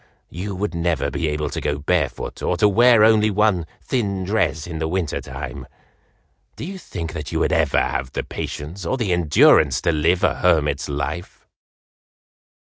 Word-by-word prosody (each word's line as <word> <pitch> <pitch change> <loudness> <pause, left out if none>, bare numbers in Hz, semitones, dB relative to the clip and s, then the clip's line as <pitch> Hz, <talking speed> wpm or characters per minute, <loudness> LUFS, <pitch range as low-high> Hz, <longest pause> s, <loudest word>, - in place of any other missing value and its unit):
You 95 +4 -5
would 105 +3 -3
never 85 -3 -1
be 80 - -2
able 75 -1 -2
to - - -4
go 75 - -1
barefoot 70 - -2
or 90 - 0
to 105 - +4
wear 115 +2 +5
only 110 -1 +5
one 100 -5 +1 0.2
thin 100 -7 -1
dress 90 -6 0
in 80 -2 -6
the 80 - -1
winter 85 -2 -2
time! - - -7 0.9
Do - - -6
you 190 +2 -7
think 85 - -6
that 75 -3 -6
you - - -1
would - - +1
ever - - +2
have 65 - -2
the - - -2
patience 80 +7 -6
or 130 +10 -1
the 105 -8 0
endurance 85 -4 +4
to 85 - +2
live 85 +3 +1
a - - +3
hermit's 75 -5 +1
life?" 75 +5 -5
85 Hz, 175 wpm, -21 LUFS, 80-105 Hz, 0.9 s, wear